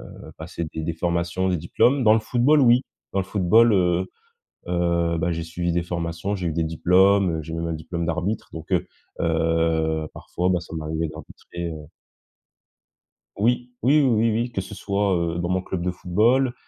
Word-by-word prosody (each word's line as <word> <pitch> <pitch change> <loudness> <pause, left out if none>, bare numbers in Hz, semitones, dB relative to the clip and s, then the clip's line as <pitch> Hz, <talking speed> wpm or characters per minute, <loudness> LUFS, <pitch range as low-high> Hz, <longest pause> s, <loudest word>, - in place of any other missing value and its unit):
heu, - - -12
passer 85 +1 -5
des 80 - -4
des 80 +1 -2
formations, 85 +2 -1
des 90 -2 +1
diplômes. 125 - +2
Dans 110 -1 +6
le - - +2
football 125 +7 +3
oui, 125 -1 +5 0.3
dans 100 - +1
le 95 - -2
football, 105 +4 +4
heu 90 -1 +2 0.6
heu, 85 -1 +1
bah, 85 +1 0
j'ai 85 0 -3
suivi 85 +1 -3
des 85 0 0
formations, 85 +3 -3
j'ai 90 -3 -3
eu - - -1
des 85 +1 0
diplômes, 90 +1 +3
j'ai 80 +1 -8
même 85 0 -3
un 85 - -2
diplôme 85 +2 -4
d'arbitre 90 +6 -2
donc 80 +1 -9
heu 90 - +1 0.4
heu, 80 -1 +1
parfois, 90 +1 -2
bah, 90 -1 +2
ça 85 -1 -9
m'arrivait 80 +1 -2
d'arbitrer, 85 +2 -8
heu 75 -1 -9 1.5
Oui, 120 +3 0
oui, 145 +5 +5
oui, 135 - +3
oui, 115 0 +2
oui, 120 +3 -1
que 95 - -2
ce 95 - -9
soit, 100 0 0
heu, 85 0 -1
dans 85 0 -2
mon 95 0 +1
club 95 -1 -4
de 90 - 0
football, 115 +9 +2
85 Hz, 190 wpm, -23 LUFS, 85-100 Hz, 1.5 s, Dans